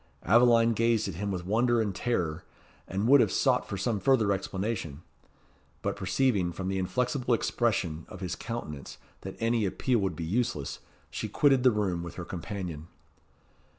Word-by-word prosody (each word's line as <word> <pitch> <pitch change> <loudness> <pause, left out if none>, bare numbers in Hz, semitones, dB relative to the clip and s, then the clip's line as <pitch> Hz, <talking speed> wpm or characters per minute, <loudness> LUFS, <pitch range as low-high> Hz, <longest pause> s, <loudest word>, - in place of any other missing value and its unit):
Aveline 115 +3 +5
gazed 115 -1 +2
at 95 - -4
him 100 +5 -3
with 90 -2 -4
wonder 120 +4 +2
and 105 -3 0
terror, 90 -7 -1 0.4
and 100 +4 -1
would 140 +1 +7
have 105 - +2
sought - - +1
for 100 - -3
some 105 +2 -1
further 115 -4 +3
explanation; 95 -5 -3 0.8
but - - -1
perceiving 95 -2 +1
from 95 +2 -4
the 95 0 -1
inflexible 125 +5 0
expression 95 -10 -1
of 90 - -9
his 90 -2 -3
countenance 75 - -6 0.2
that 95 - -7
any 115 0 +1
appeal 115 +5 +1
would 95 -4 -1
be 80 - -4
useless, 90 - -2 0.3
she - - -4
quitted 135 -3 +3
the 130 - +6
room 100 -6 -1
with 85 -1 -7
her 90 - -6
companion. 85 -3 -6
100 Hz, 165 wpm, -29 LUFS, 90-120 Hz, 0.8 s, would